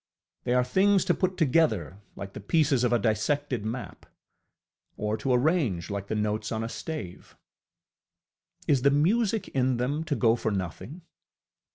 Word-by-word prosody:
They 125 - +1
are 125 - +4
things 190 +8 +3
to 180 - +3
put 185 0 -1
together 125 - +1
like 100 0 -8
the - - -7
pieces 140 - +2
of 120 - +2
a 120 - +4
dissected 120 +3 0
map, 115 +3 -6 0.9
or 105 +1 -1
to 130 +5 -2
arrange 125 - +1
like 100 -1 -4
the 110 - -2
notes 105 0 -1
on 110 0 -2
a 115 - -4
stave. 115 - -7 1.3
Is 140 -4 +3
the 140 - +5
music 195 +9 +1
in 130 -2 +1
them 140 +6 -1
to 150 - -1
go 115 -3 +3
for 120 - -2
nothing? 100 - -5
125 Hz, 160 wpm, -27 LUFS, 105-155 Hz, 1.3 s, the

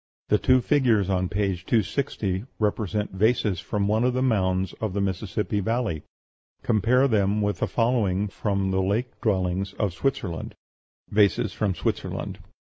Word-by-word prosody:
The 105 - +4
two 130 -1 +4
figures 115 -8 +2
on 95 -1 0
page 95 -4 -1
260 105 -3 0
represent 105 -1 -1
vases 105 -1 +1
from 100 +1 -1
one 110 +3 +2
of 125 0 +1
the 130 - +1
mounds 95 -6 +1
of 110 -4 -2
the 100 - -1
Mississippi 100 +2 -1
Valley. 110 -6 -1 0.6
Compare 120 +5 +3
them 105 -3 +2
with 105 -1 -1
the - - 0
following 105 -5 +1
from 100 -1 -1
the 95 0 +1
lake 110 +6 -2
dwellings 95 -2 0
of 100 -3 -1
Switzerland: 100 -7 -3 0.6
VASES 105 0 +3
FROM 100 -2 -1
SWITZERLAND. - - -3
105 Hz, 145 wpm, -25 LUFS, 95-115 Hz, 0.6 s, The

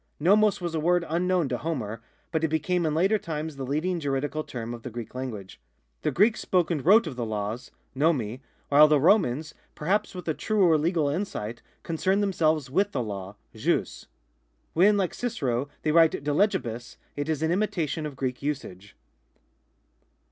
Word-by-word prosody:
NoMoc 205 +6 +4
was 170 -2 -3
a 160 - 0
word 175 +2 +2
unknown 175 0 +1
to 125 - -2
Homer, 115 -9 -4 0.3
but 160 -1 -1
it - - +4
became 160 +2 0
in 155 - -1
later 195 +6 +3
times 155 -3 -5
the 135 - -5
leading 155 +7 -1
juridical 145 +1 -2
term 120 -4 -6
of 120 - -8
the 125 - -6
Greek 120 -1 -7
language. 115 -7 -7 0.4
The - - 0
Greeks 215 +4 +3
spoke 180 -2 +1
and 150 -5 -1
wrote 210 +6 +6
of 155 -6 -5
the 120 - -2
laws 110 +2 -4
( - - -42
t'onoi). 130 -6 +1 0.3
while 150 +2 +7
the 150 -1 +4
Romans, 155 - +2 0.2
perhaps 195 +6 -1
with 180 -2 -7
a 160 - +1
truer 190 -3 +2
legal 160 0 +1
insight, 140 - -3 0.2
concerned 190 +5 0
themselves 160 -7 +1
with 195 +9 0
the 125 - -1
law 100 -2 -6 0.2
(jus). - - -1 0.7
When, 200 +5 +5
like 190 -3 0
Cicero, 140 - -2
they 155 - +1
write 165 0 +6
de 145 - 0
legihus, 120 - -1 0.2
it 145 +2 -3
is 155 -1 -1
in 160 - +1
imitation 165 -6 -1
of 145 - -9
Greek 130 -1 -3
usage. 105 -9 -5
155 Hz, 175 wpm, -26 LUFS, 130-180 Hz, 0.7 s, while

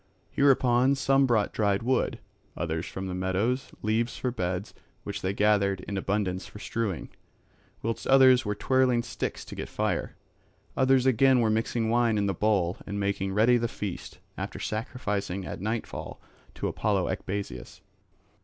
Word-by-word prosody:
Hereupon 130 -1 +4
some 135 0 +3
brought 110 -4 +1
dried 100 0 +1
wood, 125 +1 +1 0.4
others 80 0 -2
from 95 - -5
the 95 - -4
meadows 95 +8 -1
leaves 115 +3 0
for 125 - -1
beds 95 -3 -3 0.3
which - - -5
they 95 - 0
gathered 100 -2 +2
in 100 - -5
abundance 95 -1 -1
for - - -12
strewing, 105 -2 -3 0.7
whilst 115 0 -3
others 130 -1 +6
were 105 -1 -2
twirling 125 +1 +2
sticks - - -4
to - - -9
get - - -6
fire; - - -2 0.6
others 130 -1 +3
again 130 0 +5
were 110 -2 +2
mixing 110 +1 0
wine 120 -2 +3
in 100 - +1
the 100 - 0
bowl 95 -3 +1
and 100 +1 -3
making 100 -1 -1
ready 115 +4 +5
the 120 0 0
feast, 100 -5 -6 0.2
after - - -5
sacrificing 105 -4 -3
at - - -6
nightfall 110 +2 -4 0.4
to - - -2
Apollo - - 0
Ecbasius. 95 -6 -5
110 Hz, 155 wpm, -27 LUFS, 100-125 Hz, 0.7 s, others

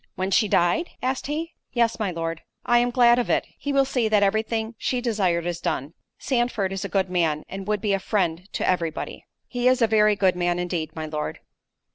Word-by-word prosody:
"When 190 +1 -2
she 210 +3 +4
died?" 185 - +2
asked 260 +1 -1
he. 320 +3 -3 0.2
"Yes, 235 -2 +1
my 210 -3 0
Lord." 165 -1 -4 0.2
"I 240 0 +4
am 245 0 +2
glad 240 -1 +5
of 245 - -1
it—he 285 - -1
will 275 -1 +3
see 250 -4 0
that 210 -1 +3
every 210 +2 +3
thing 225 0 -3
she 250 - 0
desired 195 -8 0
is 175 -1 -3
done—Sandford 200 - -2
is 195 - -4
a - - -4
good 190 -2 0
man, 160 -4 0
and 195 +1 -7
would 210 -1 0
be 205 -2 +1
a 195 - +1
friend 180 -2 -1
to - - -1
every 175 -3 +2
body." 160 - -7 0.2
"He 245 -1 -1
is 255 0 +4
a 235 - +5
very 215 -1 +4
good 190 -3 +2
man 175 0 0
indeed, 175 -3 -3
my 160 -1 -4
Lord." 155 -1 -4
205 Hz, 215 wpm, -24 LUFS, 175-240 Hz, 0.2 s, glad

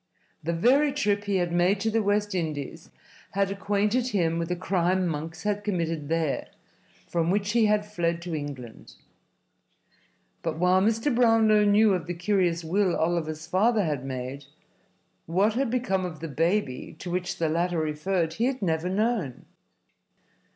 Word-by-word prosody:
The 165 - -2
very 265 - +3
trip 205 -7 0
he 200 -1 0
had 175 -2 0
made 175 +3 +2
to 225 - 0
the 225 +1 +2
West 205 0 0
Indies 160 -2 -4 0.4
had 195 0 +1
acquainted 205 +5 0
him 170 -8 0
with 165 0 -3
a 180 - 0
crime 185 0 0
Monks 160 0 -4
had 205 0 -1
committed 165 -7 -2
there, 165 -3 -1 0.6
from 170 -1 0
which 200 +2 +1
he 225 -1 +3
had 210 0 +2
fled 170 -5 -1
to 175 -1 -5
England. 140 -6 -7 1.5
But, - - -3
while 180 +2 +3
Mr. 225 +6 +1
Brownlow 225 -3 +4
knew 205 0 +5
of 175 -4 -2
the 175 - -3
curious 175 -2 +1
will 180 +2 +1
Oliver's 160 -1 -1
father 205 +6 +2
had 145 -5 -2
made, 130 +1 -5 0.8
what 195 +6 +2
had 260 +2 0
become 230 -6 0
of 170 -4 -5
the 165 - -5
baby 165 -2 -1
to 175 +2 -6
which 180 0 -2
the 165 - 0
latter 170 +2 0
referred 160 +2 -1
he 225 +8 0
had 260 0 -1
never 165 0 0
known. 205 - -1
180 Hz, 160 wpm, -26 LUFS, 165-210 Hz, 1.5 s, knew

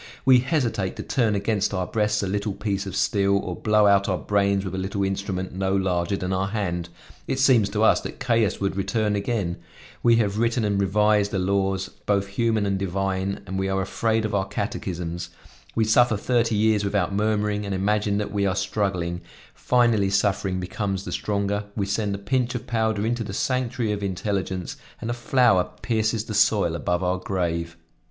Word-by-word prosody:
We 130 -1 +7
hesitate 125 - -1
to - - -6
turn 115 -6 +1
against 100 0 0
our 90 -1 -1
breasts 105 0 0
a - - -1
little 100 +1 -2
piece 100 -1 -3
of 95 - -5
steel, 100 -1 +2
or 90 -2 -3
blow 105 +1 +3
out 100 0 +4
our 95 - +1
brains 100 0 +1
with 95 - -4
a - - -3
little 95 +1 -2
instrument 95 -1 -3
no 95 +1 0
larger 95 0 0
than 90 0 -2
our 95 +1 0
hand; 90 -5 -2 0.4
it 135 - -1
seems 125 -6 +4
to 105 +1 0
us - - +5
that - - -7
chaos 115 -4 +1
would 100 -1 -1
return 105 +1 0
again; 100 -4 -1 0.4
we 120 -1 +5
have 105 -2 +1
written 115 0 +1
and 100 -1 +1
revised 105 +1 +3
the 100 - -2
laws 95 0 0 0.2
both 100 -1 +2
human 110 0 +1
and 100 -1 0
divine 95 +1 -2
and 95 0 -4
we 95 0 -1
are 95 0 0
afraid 110 +3 0
of 110 - -3
our 95 -1 0
catechisms; 85 -1 -4 0.5
we 110 - +2
suffer 110 0 +4
thirty 115 +1 +1
years 105 0 +2
without 100 -2 0
murmuring 105 0 0
and 100 -1 -3
imagine 105 +1 +1
that 105 -1 -2
we 100 -1 0
are 95 - 0
struggling; 95 -3 -1 0.3
finally 120 -5 +2
suffering 95 -1 +1
becomes 95 +1 -3
the - - -5
stronger, 100 0 -1
we 100 - -1
send 100 0 -1
a - - -4
pinch 125 +5 -1
of 125 - -4
powder 110 -4 0
into 120 0 -1
the 100 -3 -6
sanctuary 125 -1 -1
of 105 -1 -2
intelligence, 95 -1 -3 0.2
and 115 - -3
a - - 0
flower 120 -6 +3
pierces 110 -1 0
the 110 - -5
soil 105 -4 +3
above 90 +2 -1
our 90 0 0
grave." 85 -3 -2
100 Hz, 190 wpm, -24 LUFS, 95-110 Hz, 0.5 s, We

